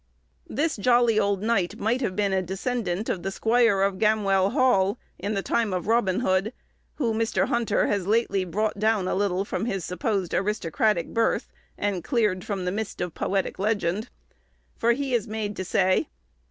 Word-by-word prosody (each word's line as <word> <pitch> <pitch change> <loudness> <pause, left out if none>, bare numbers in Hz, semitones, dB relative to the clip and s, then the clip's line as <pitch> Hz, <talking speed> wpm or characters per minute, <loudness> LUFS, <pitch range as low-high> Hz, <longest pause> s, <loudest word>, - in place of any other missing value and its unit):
This 310 +1 -1
jolly 240 0 +3
old 200 -1 0
knight 215 -6 0
might 235 +5 0
have 190 -7 -1
been 200 -2 +1
a 190 - +2
descendant 195 +1 -2
of 180 - -2
the 195 - -2
squire 225 -1 +2
of 195 -1 0
Gamwell 200 -3 +3
Hall, 240 -5 +2 0.2
in 205 +3 -2
the 195 - -1
time 225 -5 0
of 180 - -2
Robin 225 -3 +2
Hood 195 +1 +1 0.4
(who 235 -6 0
Mr. 225 +1 0
Hunter 235 -1 +1
has 200 -3 -1
lately 205 -3 +2
brought 205 +4 -2
down 215 -3 +2
a - - 0
little 195 -1 0
from 215 - -3
his 195 -7 -2
supposed 195 - -2
aristocratic 200 -1 0
birth, 230 0 0 0.3
and 200 -4 -2
cleared 210 -8 0
from 195 -3 -3
the 180 - 0
mist 215 +1 -4
of 180 -2 -3
poetic 195 -1 -2
legend)—for 215 +3 -2
he 270 +1 -3
is 235 -4 +1
made 215 -1 -3
to 185 - -3
say 185 0 +2
205 Hz, 175 wpm, -25 LUFS, 190-230 Hz, 0.4 s, jolly